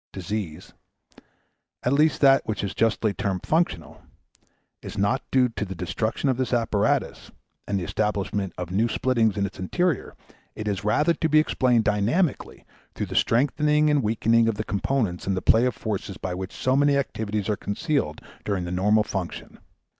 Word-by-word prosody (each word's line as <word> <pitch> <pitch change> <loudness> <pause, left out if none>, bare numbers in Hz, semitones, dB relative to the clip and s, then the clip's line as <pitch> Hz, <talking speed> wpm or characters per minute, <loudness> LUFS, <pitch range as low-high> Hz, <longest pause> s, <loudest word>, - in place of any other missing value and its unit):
Disease 95 -4 -5 1.1
at 125 - +1
least 150 +2 +3
that 135 -1 +6
which 105 -2 -2
is 100 - -3
justly 115 -2 +1
termed 95 -2 -3
functional 155 - -1 0.8
is - - -8
not 110 +7 +1
due 130 -1 +3
to 115 - -4
the 95 -1 -6
destruction 110 - -2
of 130 -2 +1
this 130 -2 -1
apparatus, 115 -4 0 0.4
and 100 -1 0
the - - -4
establishment 100 +1 -2
of 90 -1 -5
new 110 +5 +2
splittings 115 -3 +1
in 100 - +1
its 95 - -7
interior; 170 - -1 0.4
it 110 - -5
is 100 -1 -2
rather 150 +11 +2
to 160 - -1
be 155 - +4
explained 125 -6 +3
dynamically 110 - 0 0.3
through - - -2
the - - -7
strengthening 150 +5 +2
and 145 -1 +3
weakening 115 +1 +2
of 115 - +1
the 110 - -3
components 100 -4 -1
in 95 - +1
the - - 0
play 115 +3 +4
of 125 - -2
forces 100 -3 -4
by 90 - -4
which 95 +1 -5
so 130 0 0
many 145 0 +3
activities 110 -6 -2
are 105 - +1
concealed 100 - -2 0.2
during 100 -3 -2
the 85 - -5
normal 105 +4 +3
function. 95 -5 -6
110 Hz, 175 wpm, -25 LUFS, 100-130 Hz, 1.1 s, that